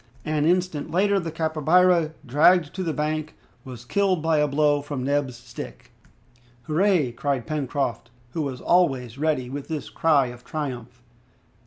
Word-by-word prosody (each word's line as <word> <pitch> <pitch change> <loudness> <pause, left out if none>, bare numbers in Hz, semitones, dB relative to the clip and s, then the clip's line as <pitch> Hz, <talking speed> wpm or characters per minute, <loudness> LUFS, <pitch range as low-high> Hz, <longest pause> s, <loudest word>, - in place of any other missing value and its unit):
An 155 0 +1
instant 180 -4 0
later 200 +3 +2
the 170 -3 -4
capybara, 160 +1 +2
dragged 155 +5 +4
to 190 - -4
the 170 -3 -1
bank, 155 0 -2 0.3
was 125 -3 -10
killed 195 +4 +1
by 160 -1 +2
a 150 - +3
blow 145 0 +2
from 140 -3 -5
Neb's 140 -2 0
stick. 120 0 -10 0.7
"Hurrah!" 165 -3 +2
cried 135 -2 -1
Pencroft, 140 -5 -2 0.2
who 160 - -3
was 135 -4 -4
always 135 -9 +1
ready 150 -5 0
with 140 +2 -6
this 155 -3 -5
cry 150 -5 +3
of 125 0 -15
triumph. 125 -5 -6
150 Hz, 150 wpm, -24 LUFS, 135-165 Hz, 0.7 s, dragged